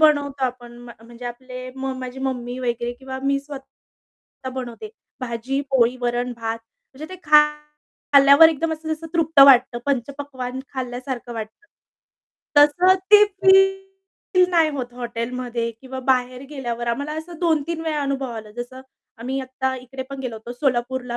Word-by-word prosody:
बनवतो 285 -3 +3
आपण. 245 -1 -5
म्ह 240 -1 -11
म्हणजे 240 +1 -12
आपले 255 +1 -8
म 265 0 -3
माझी 255 0 -7
मम्मी 250 -2 -3
वगैरे 240 -1 -2
किंवा 265 +1 -8
मी 275 0 +1
स्वतः 275 -2 -13
बनवते. 255 - -6 0.3
भाजी, 255 +3 -3
पोळी, 250 -1 +3
वरण, 245 0 -1
भात 225 0 -3 0.4
म्हणजे 305 +4 -8
ते 370 - -14
खा 300 0 +7 0.7
खाल्ल्यावर 280 +3 +8
एकदम 320 +1 -1
असं 315 0 -6
जसं 325 +1 -10
तृप्त 320 -3 +3
वाटतं, 255 -3 +6
पंचपक्वान्न 265 -1 -3
खाल्ल्यासारखं 250 -1 -5
वाटतं. 220 - -8 0.9
तसंच 355 +6 +5
ते 420 0 +10 0.2
फील 385 0 +5 0.7
नाही 330 -3 +3
होत 250 -4 -5
हॉटेलमध्ये 240 0 -3
किंवा 260 0 -8
बाहेर 255 -1 +1
गेल्यावर. 240 -4 -4
आम्हाला 285 +6 -2
असं 330 0 -9
2-3 325 -1 0
वेळा 310 -2 -1
अनुभव 275 -2 -2
आला. 220 -2 -8
जसं 245 +2 -7 0.4
आम्ही 260 +3 -3
आत्ता 260 0 -3
इकडे 255 +1 -7
पण 275 -1 -6
गेलो 245 -4 -5
होतो 225 +2 -8
सोलापूरला 250 -1 -1
260 Hz, 145 wpm, -22 LUFS, 245-285 Hz, 0.9 s, ते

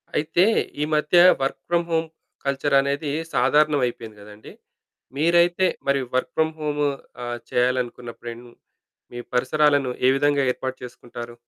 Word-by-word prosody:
అయితే 165 +5 +2 0.4
ఈ - - +2
మధ్య 150 +3 +2 0.2
వర్క్ 135 0 -2
ఫ్రామ్ 170 0 0
హోమ్ 165 0 0 0.4
కల్చరనేది 140 +1 +1 0.2
సాధారణం 145 +3 +3
అయిపోయింది 115 -3 -6
కదండీ. 105 +1 -13 0.7
మీరైతే 170 +3 +3 0.2
మరి 140 0 +2 0.2
వర్క్ 130 - 0
ఫ్రమ్ 160 0 +1
హోము 150 -1 -1 0.4
ఆహ్, 120 0 -4
చేయాలనుకున్నప్పుడేం 120 -1 -2 0.7
మీ 120 - -6
పరిసరాలను 140 +2 +2 0.2
ఏ - - +6
విధంగా 145 0 +2
ఏర్పాటు 130 +1 -5
చేసుకుంటారు? 120 -1 -9
140 Hz, 120 wpm, -23 LUFS, 125-150 Hz, 0.7 s, ఏ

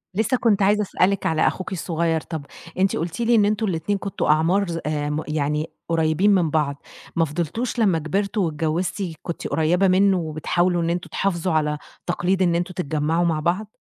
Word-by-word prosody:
لسّه 220 +5 +1
كنت 215 -4 +2
عايزة 205 +2 +3
أسألِك 195 -1 +1
على 160 -1 +2
أخوكِ 185 - -3
الصغير، 165 -2 -1
طَب 155 -3 -6 0.3
أنتِ 195 +1 +2
قُلتِ 170 +6 -3
لي 235 0 +3
إن 210 -2 +5
أنتم 215 +2 0
ال2 185 +1 -1
كنتم 195 0 -3
أعمار 165 +6 +3
ظ 170 -1 -3
آمم 150 0 -1
يعني 150 +1 -1 0.2
قريّبين 165 +4 +2
من 175 -4 +2
بعض، 145 -2 -1 0.3
ما 165 - +3
فضلتوش 175 - -3
لمّا 190 -7 +3
كبرتوا 200 +6 -1
واتجوِّزتِ 165 +5 -1 0.2
كنتِ 170 - -4
قريّبة 175 +5 +2
منّه 190 +1 +4
وبتحاولوا 175 +2 0
إن 165 - 0
أنتم 175 +1 -2
تحافظوا 180 -2 -1
على 150 -1 +1 0.3
تقليد 185 +2 0
إن 175 -2 +3
أنتم 175 +2 -2
تتجمَّعوا 160 0 0
مع 165 -2 +1
بعض؟ 185 +7 -2
170 Hz, 175 wpm, -23 LUFS, 155-195 Hz, 0.3 s, إن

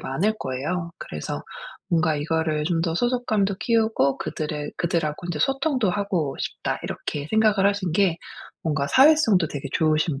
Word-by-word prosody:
많을 195 +11 0
거예요. 155 +7 -3
그래서 75 - -5 0.5
뭔가 165 -2 +2
이거를 155 0 0
좀 165 0 0
더 165 -1 -1
'소속감도 220 -4 +1
키우고 220 - +2
그들의 150 -1 -4
그들하고 170 -1 -1
인제 170 -3 -3
소통도 270 - +1
하고 180 -7 -1
싶다.' - - -3
이렇게 145 0 -4
생각을 215 -3 +3
하신 200 -5 -1
게 180 -3 +2 0.4
뭔가 145 -3 -1
사회성도 260 - +5
되게 145 -2 -6
좋으신 155 -2 +1
170 Hz, 340 characters per minute, -24 LUFS, 150-205 Hz, 0.5 s, 사회성도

